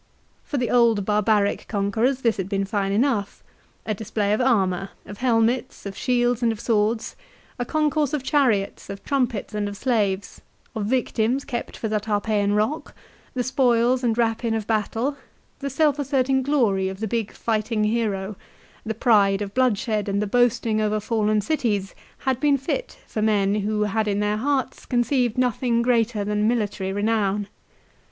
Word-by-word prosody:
For 290 - -4
the 245 -2 -1
old 230 -5 +3
barbaric 210 0 +1
conquerors 225 +6 0
this 230 -4 +1
had 190 -1 -3
been 195 -1 0
fine 195 -1 -1
enough. 215 -2 0 0.4
A 215 - -1
display 210 0 -1
of 215 - +1
armour, 195 -7 +1 0.2
of 205 - -10
helmets 245 0 +1
of 195 -1 -5
shields 245 0 +1
and 235 -1 +3
of 220 - -5
swords, 220 0 0 0.4
a 245 - -1
concourse 305 0 +1
of 295 -4 -2
chariots, 245 -12 +1
of 195 0 -7
trumpets, 250 -7 -1
and 205 -1 -1
of 200 - -8
slaves, 205 -5 -1 0.3
of 215 -3 -3
victims 250 +1 0
kept 240 -2 -5
for 225 - -3
the 215 0 0
Tarpeian 205 -1 0
rock, 220 +9 -1 0.4
the 250 - 0
spoils 250 -1 +2
and 230 -2 +1
rapine 230 -1 +1
of 220 -2 -2
battle, 225 +6 -1 0.4
the 280 - -3
self 295 +1 +2
asserting 270 -1 +1
glory 230 -9 +1
of 190 0 -7
the 220 - -2
big 225 0 -2
fighting 220 -1 -1
hero, 210 -3 -1 0.5
the 220 -1 -3
pride 205 -4 +3
of 200 0 -7
bloodshed 220 -4 +1
and 200 0 0
the 210 - 0
boasting 230 0 +2
over 215 0 +1
fallen 215 -1 +1
cities, 210 -6 -1 0.3
had 260 -2 +1
been 290 -1 +3
fit - - -4
for 215 - -4
men 205 -2 +2
who 210 +1 0
had 210 +1 0
in 205 0 0
their 210 0 0
hearts 270 +2 -1
conceived 245 -1 +1
nothing 245 -1 +1
greater 230 -3 +1
than 210 +1 +1
military 205 -5 -1
renown. 205 -1 0
220 Hz, 165 wpm, -23 LUFS, 205-245 Hz, 0.5 s, old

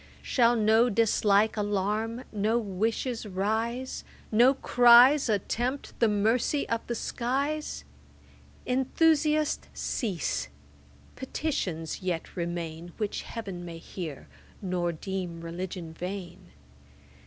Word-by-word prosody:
Shall 240 -2 +3
no 220 +2 +4
dislike 215 -1 +3
alarm, 210 +3 -1
no 215 +2 +1
wishes 225 +3 -2
rise, 220 +6 -2 0.3
No 245 +5 +5
cries 245 +2 +6
attempt 240 +6 -1
the 230 - +5
mercy 225 +7 +1
of 230 0 0
the 235 - -2
skies? 280 +7 -2 0.8
Enthusiast, 300 +3 +2
cease; 165 - -2 0.7
petitions 195 - -3
yet 180 -3 -3
remain, 170 -1 -4
Which 210 -2 -2
Heav'n 195 -6 -6
may 170 -1 -7
hear, 165 -3 -7 0.3
nor 180 -3 -1
deem 175 0 -5
Religion 170 0 -6
vain. 180 0 -7
215 Hz, 95 wpm, -28 LUFS, 180-240 Hz, 0.8 s, cries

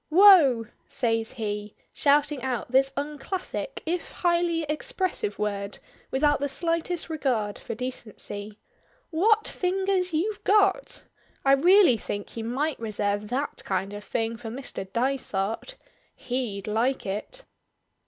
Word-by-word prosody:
"Wough!" 320 - +7 0.2
says 225 -3 0
he, 210 -3 -4 0.2
shouting 290 -1 +3
out 250 -2 -3
this 270 +1 +4
unclassic 300 - -4
if 340 +2 -2
highly 345 -1 +1
expressive 310 - -2
word 200 -1 -2 0.3
without 290 +2 +2
the 285 +1 -1
slightest 335 +2 -1
regard 250 -10 -1
for - - -6
decency. 215 -4 -5 0.5
"What 425 +7 +3
fingers 375 0 0
you've 380 +7 -1
got! 420 +4 +2 0.4
I 270 - +6
really 340 - +6
think 205 -1 -5
you 230 - -4
might 270 +6 -1
reserve 205 -2 -1
that 265 +6 -3
kind 190 +1 -2
of 205 0 -7
thing 225 +1 -2
for 225 -1 -7
Mr. 225 -6 -6
Dysart. 235 - -1 0.4
He'd 240 -6 -3
like 230 +5 0
it." 215 - -5
265 Hz, 125 wpm, -26 LUFS, 220-335 Hz, 0.5 s, Wough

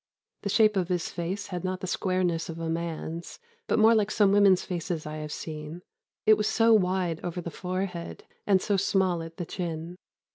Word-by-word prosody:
The 200 - -3
shape 215 0 +4
of 180 -2 +1
his 180 -2 -1
face 180 +4 -4
had 180 -2 -4
not 185 0 -2
the - - -3
squareness 180 -2 0
of 165 - -5
a 165 -1 -3
man's, 165 0 -4 0.3
but - - +2
more 220 +1 +6
like 215 -2 +2
some 205 -2 +3
women's 200 -2 +5
faces 170 -3 -3
I 155 0 -5
have 150 -1 -6
seen 155 +3 -6 0.4
it 215 0 +7
was 210 - 0
so 225 0 +4
wide 180 -5 +2
over 175 0 -3
the 170 -1 -5
forehead, 180 -1 -4 0.2
and 190 -2 +4
so 205 -2 +1
small 190 -3 +1
at 165 0 -9
the 175 - -3
chin. 170 0 -5
180 Hz, 195 wpm, -27 LUFS, 165-195 Hz, 0.4 s, it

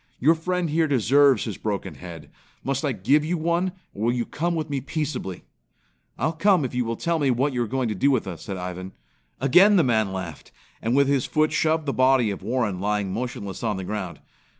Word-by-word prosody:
Your 155 +6 +5
friend 175 0 -2
here 160 +1 +2
deserves 135 -1 +4
his 110 -4 -5
broken 100 -3 -3
head. 80 -5 -10 0.3
Must 135 +1 -1
I 145 - +1
give 130 +8 +2
you 170 +3 -1
one, 170 +3 0 0.2
or 105 - -3
will 120 - +3
you 120 -1 -1
come 170 +2 -2
with 155 -2 -2
me 140 -3 -2
peaceably?" 145 - -4 0.7
"I'll 155 - 0
come 175 -1 +3
if 130 - -5
you 125 -1 0
will 115 0 -2
tell 170 +6 -1
me 140 -3 +2
what 130 +3 +1
you 125 - -1
are 120 - -1
going 130 +1 -1
to - - -1
do 135 +8 +2
with 130 -6 +1
us," 90 -4 -7
said 95 - -5
Ivan. 90 +1 -6 0.5
Again 180 +11 +6
the 175 - +5
man 110 -5 +1
laughed, 95 -5 -7 0.3
and 115 +3 0
with 140 0 +4
his 140 -3 +1
foot 155 0 +2
shoved 160 -1 +1
the 140 - -1
body 130 -4 +3
of 100 - -6
Warren 110 -3 -1
lying 100 -1 -1
motionless 115 -5 -5
on 110 -4 -1
the 95 - -4
ground. 95 -2 -5
130 Hz, 220 wpm, -24 LUFS, 105-155 Hz, 0.7 s, Again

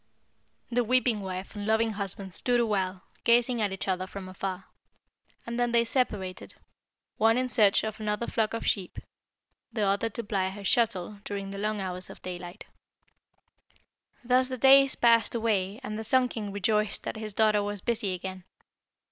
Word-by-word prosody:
The 245 +1 +2
weeping 245 -2 +2
wife 190 +1 -6
and 205 0 -5
loving 220 +1 +2
husband 195 -2 -2
stood 245 +5 +1
awhile 195 -5 -1 0.2
gazing 235 0 +3
at 205 -2 0
each 190 - -5
other 185 0 -1
from 190 0 -8
afar, 185 0 -5 0.8
and 235 +1 -4
then 240 -1 +1
they 235 0 +4
separated, 205 -7 -2 0.6
one 225 +2 +4
in 255 0 +1
search 215 -5 +4
of 220 0 -4
another 210 +1 -1
flock 225 -1 -1
of 230 - -4
sheep, 190 -4 0 0.7
the 215 - -1
other 200 +3 +1
to 230 +2 -5
ply 195 -3 -1
her 200 +1 -9
shuttle 205 -2 +1
during 200 -2 -5
the 195 - -6
long 210 0 -1
hours 185 -1 -4
of - - -11
daylight. 175 0 -7 1.6
"Thus 255 +1 +3
the 255 - -4
days 270 +1 +6
passed 230 -1 +3
away, 210 -3 0
and 215 -3 -4
the - - -4
Sun 255 +2 +3
king 210 -4 -5
rejoiced 210 +1 0
that - - -4
his 215 -2 -6
daughter 215 -1 +3
was 205 -1 -3
busy 215 -5 -1
again. 185 0 -7
210 Hz, 170 wpm, -28 LUFS, 195-235 Hz, 1.6 s, days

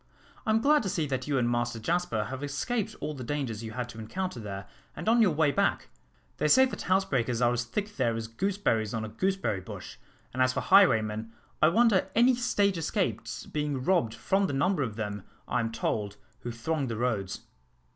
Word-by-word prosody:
"I - - +1
am 220 +1 +3
glad 300 +4 +4
to 200 - -2
see 165 -3 0
that 130 -2 -3
you 145 -2 +1
and 120 -2 +2
Master 120 -1 0
Jasper 145 -4 0
have 130 +6 -6
escaped 195 - -2
all 155 - -3
the 130 -3 -7
dangers 125 -5 -3
you 110 0 -6
had 125 0 -3
to 115 - -9
encounter 130 +7 -4
there 100 -2 -6 0.3
and 165 - -7
on 230 +1 +5
your 210 - +6
way 150 -2 +2
back. - - 0 0.5
They - - +1
say 260 - +7
that 260 - -5
housebreakers 135 -11 +1
are 120 0 +3
as 120 0 -1
thick 210 +7 -4
there 120 -3 +1
as 115 0 -4
gooseberries 115 - -1
on 110 -1 -2
a - - -6
gooseberry 185 - -1
bush; - - -9 0.4
and 130 - -1
as 130 0 +3
for - - -1
highwaymen, 115 - +4 0.3
I 155 - +7
wonder 200 0 +3
any 245 +3 +6
stage 205 -7 +1
escapes 115 - -2
being 150 -3 -2
robbed 130 -10 +2
from 190 - +1
the 145 - -3
number 145 +5 +1
of 115 -6 -2
them, 105 -2 -4 0.3
I 125 - 0
am 115 -1 -1
told, 105 -2 -2 0.2
who 120 - -6
throng 135 +5 -2
the 115 -2 -3
roads." 105 -5 -1
130 Hz, 205 wpm, -29 LUFS, 115-185 Hz, 0.5 s, say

